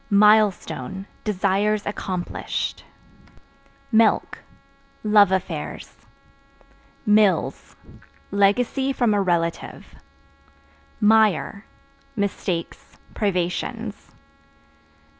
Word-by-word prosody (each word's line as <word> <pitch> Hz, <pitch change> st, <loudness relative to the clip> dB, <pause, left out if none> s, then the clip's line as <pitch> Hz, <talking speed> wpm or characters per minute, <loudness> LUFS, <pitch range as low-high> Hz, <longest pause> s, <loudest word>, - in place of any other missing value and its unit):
Milestone 200 Hz, -, +2 dB, 0.2 s
Desires 205 Hz, +1 st, 0 dB
accomplished. 185 Hz, -3 st, -4 dB, 1.1 s
Milk 225 Hz, -1 st, +2 dB, 0.6 s
Love 210 Hz, -2 st, +5 dB
affairs. 190 Hz, -1 st, -4 dB, 1.1 s
Mills 210 Hz, -2 st, +2 dB, 0.6 s
Legacy 245 Hz, +7 st, +1 dB
from 240 Hz, -5 st, +1 dB
a 205 Hz, -, +2 dB
relative 170 Hz, -3 st, -2 dB, 1.1 s
Mire 210 Hz, -2 st, +2 dB, 0.5 s
Mistakes, 195 Hz, -4 st, -4 dB, 0.2 s
privations. 205 Hz, +3 st, -3 dB
205 Hz, 55 wpm, -23 LUFS, 190-215 Hz, 1.1 s, Love